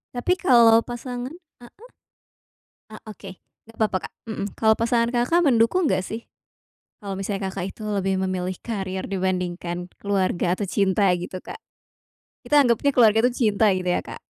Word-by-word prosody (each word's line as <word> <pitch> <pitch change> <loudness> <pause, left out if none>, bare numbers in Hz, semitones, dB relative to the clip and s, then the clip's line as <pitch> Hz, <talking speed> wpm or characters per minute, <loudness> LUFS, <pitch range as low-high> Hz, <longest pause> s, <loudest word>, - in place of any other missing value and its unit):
Tapi 245 +9 +1
kalau 230 -7 +6
pasangan 245 +1 -6 0.3
heeh. 390 - -16 1.1
Eee, 215 - -10
oke 195 -2 -10 0.3
nggak 225 0 -19
apa-apa, 210 -4 +1
Kak, - - -8
mhm. 220 -3 -4
Kalau 220 -1 +4
pasangan 230 +1 +1
Kakak 245 +8 +1
mendukung 260 +8 +3
enggak 185 -5 +1
sih, 225 +4 -7 0.7
kalau 200 -2 -5
misalnya 195 0 -3
Kakak 190 0 -4
itu - - -16
lebih 195 -2 -1
memilih 185 -1 -2
karir 190 -4 -4
dibandingkan 180 -2 -3 0.2
keluarga 185 -3 0
atau 195 +1 -2
cinta 195 +1 +2
gitu, 180 +1 -6
Kak. - - -9 0.9
Kita 295 - 0
anggepnya 240 +3 +2
keluarga 225 -3 +5
itu 245 +2 +3
cinta 215 -2 +2
gitu 185 -2 0
ya, - - +1
Kak. - - -10
205 Hz, 155 wpm, -23 LUFS, 190-235 Hz, 1.1 s, kalau